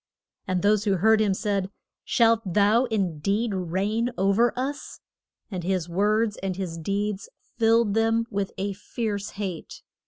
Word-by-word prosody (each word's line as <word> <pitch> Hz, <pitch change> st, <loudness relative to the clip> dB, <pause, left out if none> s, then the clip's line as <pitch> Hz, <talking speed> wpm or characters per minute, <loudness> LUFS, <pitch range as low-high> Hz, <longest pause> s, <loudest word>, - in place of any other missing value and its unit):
And 185 Hz, -2 st, -1 dB
those 210 Hz, +1 st, +3 dB
who 200 Hz, -2 st, +2 dB
heard 220 Hz, +4 st, +4 dB
him 200 Hz, -3 st, +2 dB
said, 200 Hz, -2 st, -1 dB, 0.3 s
Shalt 230 Hz, -1 st, +3 dB
thou 205 Hz, +6 st, +3 dB
in 195 Hz, -9 st, -1 dB
deed 205 Hz, +6 st, 0 dB
reign 195 Hz, +6 st, -1 dB
o'er 200 Hz, +5 st, +3 dB
us? 275 Hz, +3 st, -4 dB, 0.5 s
And 180 Hz, -3 st, -4 dB
his 180 Hz, -2 st, -1 dB
words 210 Hz, +4 st, +1 dB
and 190 Hz, -1 st, -3 dB
his 175 Hz, -3 st, -5 dB
deeds 200 Hz, +4 st, -2 dB, 0.3 s
filled 225 Hz, -2 st, +3 dB
them 225 Hz, +1 st, +2 dB
with 200 Hz, -1 st, -2 dB
a 200 Hz, +1 st, -2 dB
fierce 205 Hz, 0 st, -4 dB
hate. 190 Hz, -5 st, -6 dB
205 Hz, 150 wpm, -25 LUFS, 190-225 Hz, 0.5 s, heard